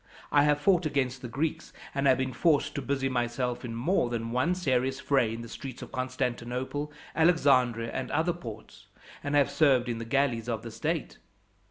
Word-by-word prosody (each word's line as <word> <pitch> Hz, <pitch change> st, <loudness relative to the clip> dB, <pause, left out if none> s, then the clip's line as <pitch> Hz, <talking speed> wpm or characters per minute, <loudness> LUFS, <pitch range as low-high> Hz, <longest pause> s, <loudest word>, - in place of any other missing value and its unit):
I 145 Hz, 0 st, +5 dB
have 150 Hz, 0 st, +3 dB
fought 175 Hz, 0 st, +3 dB
against 130 Hz, -3 st, -1 dB
the 125 Hz, -, -5 dB
Greeks, 145 Hz, +7 st, -3 dB, 0.2 s
and 140 Hz, 0 st, -1 dB
been 130 Hz, -1 st, -2 dB
forced 145 Hz, 0 st, +2 dB
to 140 Hz, -, -3 dB
busy 135 Hz, +1 st, -1 dB
myself 125 Hz, 0 st, -1 dB
in 115 Hz, -2 st, -5 dB
more 125 Hz, +2 st, +1 dB
than 115 Hz, -1 st, -3 dB
one 145 Hz, +9 st, +1 dB
serious 130 Hz, -6 st, 0 dB
fray 130 Hz, -6 st, +2 dB
in 115 Hz, +1 st, -5 dB
the -, -, -8 dB
streets 130 Hz, +2 st, -8 dB
of -, -, -10 dB
Constantinople, 130 Hz, +3 st, -3 dB, 0.2 s
Alexandria, 130 Hz, -9 st, +3 dB
and 130 Hz, -, -4 dB
other 160 Hz, +4 st, +1 dB
ports, 115 Hz, -10 st, -10 dB, 0.4 s
and 145 Hz, 0 st, -1 dB
have 145 Hz, -2 st, +4 dB
served 135 Hz, -5 st, +3 dB
in 115 Hz, -2 st, -2 dB
the 115 Hz, -, -5 dB
galleys 120 Hz, -2 st, 0 dB
of 115 Hz, -2 st, -2 dB
the 115 Hz, -, -7 dB
state. -, -, -3 dB
130 Hz, 185 wpm, -29 LUFS, 120-145 Hz, 0.4 s, I